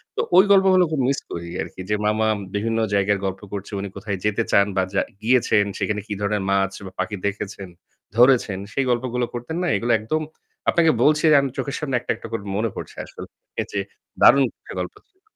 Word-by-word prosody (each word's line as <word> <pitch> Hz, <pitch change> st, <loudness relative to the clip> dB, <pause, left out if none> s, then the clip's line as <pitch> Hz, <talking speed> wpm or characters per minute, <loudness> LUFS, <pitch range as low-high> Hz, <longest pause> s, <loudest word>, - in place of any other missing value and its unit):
তো 465 Hz, -, +1 dB, 0.2 s
ওই 190 Hz, -, +9 dB
গল্পগুলো 190 Hz, -2 st, +6 dB
খুব 150 Hz, -, -1 dB
মিস 140 Hz, -, 0 dB
করি 85 Hz, 0 st, -5 dB
আরকি -, -, -7 dB
যে 105 Hz, -, +2 dB
মামা 110 Hz, +1 st, +2 dB, 0.3 s
বিভিন্ন 115 Hz, +2 st, 0 dB
জায়গায় 100 Hz, 0 st, +2 dB
গল্প 95 Hz, +1 st, -3 dB
করছে, 100 Hz, +1 st, -5 dB
উনি 100 Hz, 0 st, -4 dB
কোথায় 100 Hz, -1 st, -4 dB
যেতে 105 Hz, -1 st, +1 dB
চান 100 Hz, 0 st, +5 dB
বা 95 Hz, -, +3 dB
যা 100 Hz, -, +2 dB, 0.2 s
গিয়েছেন 115 Hz, -3 st, +3 dB
সেখানে 105 Hz, -1 st, -1 dB
কি 105 Hz, -, -3 dB
ধরনের 100 Hz, -1 st, 0 dB
মাছ 95 Hz, 0 st, +1 dB
বা 95 Hz, -, -8 dB
পাখি 95 Hz, +3 st, -1 dB
দেখেছেন, 100 Hz, -2 st, -5 dB, 0.5 s
ধরেছেন। 120 Hz, -5 st, +4 dB
সেই 135 Hz, -1 st, 0 dB
গল্পগুলো 125 Hz, 0 st, 0 dB
করতেন 120 Hz, +7 st, -5 dB
না? 180 Hz, -, 0 dB
এইগুলো 120 Hz, +1 st, 0 dB
একদম 155 Hz, +9 st, -1 dB, 0.5 s
আপনাকে 165 Hz, -2 st, +4 dB
বলছি 150 Hz, +1 st, +4 dB
যে -, -, +7 dB
আমি 135 Hz, -, -1 dB
চোখের 140 Hz, -, -2 dB
সামনে 135 Hz, -4 st, -2 dB
একটা, 120 Hz, -, -3 dB
একটা -, -, -9 dB
করে 115 Hz, -3 st, -3 dB
মনে 110 Hz, +1 st, 0 dB
পড়ছে -, -, -8 dB
আসলে। -, -, -10 dB, 0.5 s
যে 100 Hz, -, 0 dB, 0.4 s
দারুণ 140 Hz, -, +7 dB, 0.2 s
একটা -, -, -10 dB
গল্প 90 Hz, -, -6 dB
ছিল। 380 Hz, -1 st, -42 dB
110 Hz, 200 wpm, -22 LUFS, 100-135 Hz, 0.5 s, ওই